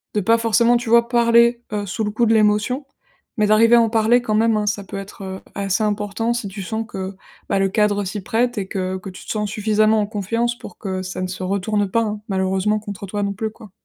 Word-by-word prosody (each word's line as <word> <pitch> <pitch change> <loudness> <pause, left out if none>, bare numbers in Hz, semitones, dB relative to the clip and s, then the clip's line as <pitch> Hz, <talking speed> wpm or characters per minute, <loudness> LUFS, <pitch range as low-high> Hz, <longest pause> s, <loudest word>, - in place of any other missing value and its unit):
de 210 - +2
pas 225 +4 +3
forcément, 230 +1 +3
tu 235 -1 -5
vois, 235 0 +5
parler, 235 0 +4
heu, 205 -1 -2
sous 200 +3 -3
le 210 - -1
coup 235 +3 +1
de 225 - +3
l'émotion, 215 +5 +2 0.5
mais 210 -1 +3
d'arriver 225 +3 +5
à 235 - +6
en 225 - +2
parler 225 +2 +3
quand 215 -3 -1
même, 225 0 +3
hein. 210 - 0
Ça 205 0 -1
peut 195 - -7
être, 195 0 -8
heu, 190 0 -6 0.2
assez 200 +1 0
important 210 +2 -1
si 235 -3 -3
tu 195 +1 -7
sens 220 +4 -3
que, 190 -1 -6 0.3
bah, - - +1
le 195 0 +2
cadre 205 0 +1
s'y 200 +2 -4
prête 240 +5 0
et 195 -2 -2
que 190 -1 -3
que 190 +1 -8
tu 185 - -12
te - - -5
sens 210 -1 -1
suffisamment 215 +1 +2
en 205 - -1
confiance 230 +4 -1
pour - - -11
que 190 -2 -4
ça 185 0 -5
ne 185 - -1
se 185 0 -6
retourne 200 +2 0
pas, 230 - +2
hein, 210 -1 -3
malheureusement 190 +2 0
contre 205 -2 -7
toi, 205 +2 -2
non 200 0 -1
plus, 220 +2 -3
quoi. 215 -2 -15
210 Hz, 250 wpm, -21 LUFS, 195-225 Hz, 0.5 s, à